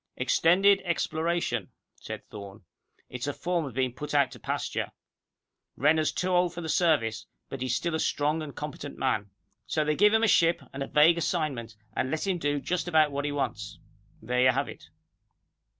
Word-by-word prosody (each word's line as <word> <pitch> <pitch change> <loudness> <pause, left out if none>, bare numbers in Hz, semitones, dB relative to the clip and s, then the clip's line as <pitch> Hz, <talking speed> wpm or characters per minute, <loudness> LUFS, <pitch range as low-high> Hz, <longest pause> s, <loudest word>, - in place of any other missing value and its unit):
"Extended 195 +4 +4
Exploration," 165 - -1 0.3
said - - -8
Thorne. 100 0 -10 0.4
"It's 125 +2 -5
a 145 - -2
form 175 -2 -1
of 130 -5 -8
being 130 -2 0
put 150 +3 -5
out 140 -3 +3
to - - -11
pasture. - - -3 0.8
Renner's 155 +2 +3
too 185 - -2
old 180 -1 +2
for 175 - -5
the 160 - -5
Service, 150 -11 +1 0.2
but 135 - -6
he's 130 -1 0
still 170 -1 -1
a 160 - 0
strong 150 +2 0
and 150 -3 -7
competent 150 -1 -6
man. 105 -6 0 0.4
So 155 -1 0
they 150 0 +1
give 210 +4 +5
him 220 - +3
a - - +5
ship, 170 -4 +3
and 135 - -6
a 135 - -2
vague 165 +3 +5
assignment, 140 -10 -2 0.2
and 130 - 0
let 155 +5 -2
him 190 -3 0
do 145 -2 0
just 175 +6 -2
about 155 -3 +4
what 140 +1 -2
he 145 - -1
wants. 145 -1 -3 0.5
There 125 +2 0
you 130 - +6
have 135 +3 +1
it." - - -12
150 Hz, 190 wpm, -28 LUFS, 130-170 Hz, 0.8 s, you